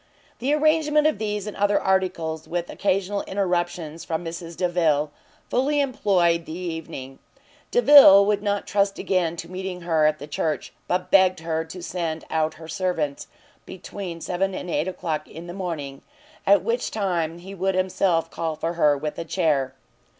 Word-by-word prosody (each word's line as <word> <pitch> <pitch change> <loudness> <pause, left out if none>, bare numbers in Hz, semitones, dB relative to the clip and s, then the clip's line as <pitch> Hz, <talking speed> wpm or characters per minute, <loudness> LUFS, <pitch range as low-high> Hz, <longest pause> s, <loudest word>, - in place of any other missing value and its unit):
The 260 +4 0
arrangement 305 0 +3
of 310 - +2
these 210 -2 -2
and 210 - -6
other 205 0 +2
articles, 175 -4 -1
with 175 0 -3
occasional 195 +1 0
interruptions 175 -4 -2
from 165 +1 -3
Mrs 165 0 -7
Delvile, 165 -5 +1 0.4
fully 290 +4 +1
employed 185 -11 +1
the 160 - -6
evening. 160 -7 -6 0.5
Delvile 280 - +8
would 205 0 +1
not 205 -1 -1
trust 200 -1 +1
again 175 -3 0
to 170 - -7
meeting 185 -1 -5
her 160 -3 +2
at 155 0 +1
the 145 - -8
church; 155 +1 -3
but 180 0 -1
begged 185 -3 +5
her 160 0 -1
to 175 +2 -9
send 165 -3 -3
out 160 0 0
her 160 0 -11
servants 160 -4 -2 0.4
between 180 -2 -7
seven 190 +2 -1
and 180 - -5
eight 170 - 0
o'clock 155 -4 -3
in 165 +2 -10
the 175 - -7
morning, 160 -8 -5 0.5
at 200 -2 +5
which 235 +3 -1
time 175 -6 -1
he 185 +3 -10
would 190 0 -1
himself 185 -3 +1
call 160 -2 -3
for 165 +2 -3
her 150 -4 +3
with 150 +1 -4
a - - -2
chair. 150 -7 0
175 Hz, 165 wpm, -24 LUFS, 160-195 Hz, 0.5 s, Delvile